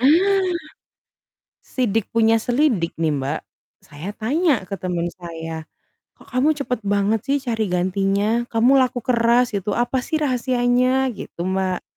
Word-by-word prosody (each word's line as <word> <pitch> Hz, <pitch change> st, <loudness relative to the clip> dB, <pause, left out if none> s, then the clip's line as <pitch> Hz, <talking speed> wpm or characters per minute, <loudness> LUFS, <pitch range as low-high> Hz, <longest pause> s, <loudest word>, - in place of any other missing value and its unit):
Ah! 370 Hz, +8 st, +4 dB, 1.1 s
Sidik 225 Hz, -4 st, -1 dB
punya 225 Hz, 0 st, +4 dB
selidik, 240 Hz, -, +1 dB
nih, 160 Hz, -2 st, +2 dB
Mbak, 140 Hz, +2 st, -2 dB, 0.4 s
saya 150 Hz, +5 st, -9 dB
tanya 275 Hz, -, +1 dB
ke -, -, -3 dB
teman 175 Hz, -2 st, -2 dB
saya, 165 Hz, -1 st, -6 dB, 0.5 s
"Kok, -, -, -19 dB
kamu 255 Hz, +4 st, +2 dB
cepat 250 Hz, -4 st, -2 dB
banget 205 Hz, +2 st, +1 dB
sih 280 Hz, -, +3 dB
cari 225 Hz, -2 st, 0 dB
gantinya? 195 Hz, +5 st, +1 dB
Kamu 235 Hz, +3 st, +4 dB
laku 250 Hz, -1 st, 0 dB
keras 240 Hz, 0 st, +3 dB
gitu, 200 Hz, +1 st, -2 dB
apa 245 Hz, +2 st, 0 dB
sih 315 Hz, -, -1 dB
rahasianya?" 255 Hz, 0 st, +2 dB
Gitu, 195 Hz, -, -10 dB
Mbak. 190 Hz, -1 st, -1 dB
225 Hz, 135 wpm, -21 LUFS, 190-255 Hz, 1.1 s, Ah